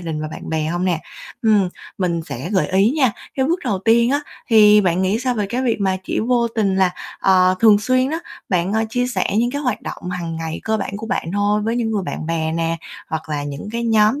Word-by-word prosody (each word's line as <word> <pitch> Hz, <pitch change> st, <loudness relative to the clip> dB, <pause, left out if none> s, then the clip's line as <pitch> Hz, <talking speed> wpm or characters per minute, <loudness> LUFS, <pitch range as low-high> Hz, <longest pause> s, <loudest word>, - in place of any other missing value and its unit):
đình 160 Hz, -3 st, -4 dB
và 155 Hz, -, -3 dB
bạn -, -, -9 dB
bè 160 Hz, -1 st, -1 dB
hông 175 Hz, +3 st, -1 dB
nè? 175 Hz, -4 st, 0 dB, 0.4 s
Ừm, 210 Hz, -4 st, +4 dB, 0.3 s
mình 170 Hz, -3 st, 0 dB
sẽ 135 Hz, +6 st, -5 dB
gợi 190 Hz, -3 st, +2 dB
ý 195 Hz, +4 st, +3 dB
nha. 260 Hz, -7 st, +3 dB, 0.2 s
Cái 265 Hz, 0 st, +1 dB
bước 340 Hz, +3 st, +1 dB
đầu 205 Hz, -6 st, 0 dB
tiên 235 Hz, +4 st, +3 dB
á 285 Hz, +1 st, +2 dB, 0.3 s
thì 210 Hz, -2 st, +7 dB
bạn 180 Hz, -2 st, +1 dB
nghĩ 195 Hz, +4 st, +1 dB
sao 250 Hz, -1 st, 0 dB
về 210 Hz, -3 st, -1 dB
cái 245 Hz, +5 st, -2 dB
việc 235 Hz, -4 st, 0 dB
mà 190 Hz, -1 st, +1 dB
chỉ -, -, -1 dB
vô 235 Hz, 0 st, +1 dB
tình 205 Hz, -4 st, 0 dB
là, 190 Hz, -1 st, +3 dB, 0.3 s
ờ, 185 Hz, -1 st, +4 dB
thường 215 Hz, -2 st, +7 dB
xuyên 255 Hz, +4 st, +1 dB
đó 325 Hz, -, -1 dB, 0.3 s
bạn, 180 Hz, +1 st, 0 dB
ơ, 220 Hz, +1 st, +1 dB
chia 245 Hz, +1 st, 0 dB
sẻ 250 Hz, -, -1 dB
những 240 Hz, +2 st, +2 dB
cái 285 Hz, +3 st, -3 dB
hoạt 250 Hz, -5 st, -1 dB
động 180 Hz, -, -6 dB
hằng 170 Hz, -2 st, -4 dB
ngày 160 Hz, 0 st, -4 dB
cơ 220 Hz, 0 st, +1 dB
bản 200 Hz, -1 st, -4 dB
của 220 Hz, +1 st, -6 dB
bạn 165 Hz, -, -2 dB
thôi 205 Hz, +1 st, +1 dB
với 225 Hz, +2 st, -1 dB
những 225 Hz, -2 st, 0 dB
người 210 Hz, -3 st, -1 dB
bạn 160 Hz, -, -5 dB
bè 160 Hz, -1 st, -1 dB
nè, 165 Hz, 0 st, -1 dB, 0.3 s
hoặc 160 Hz, 0 st, -4 dB
là 145 Hz, -2 st, -2 dB
những 145 Hz, +7 st, -6 dB
cái 235 Hz, 0 st, -2 dB
nhóm 220 Hz, +4 st, +3 dB
205 Hz, 250 wpm, -20 LUFS, 175-230 Hz, 0.4 s, thì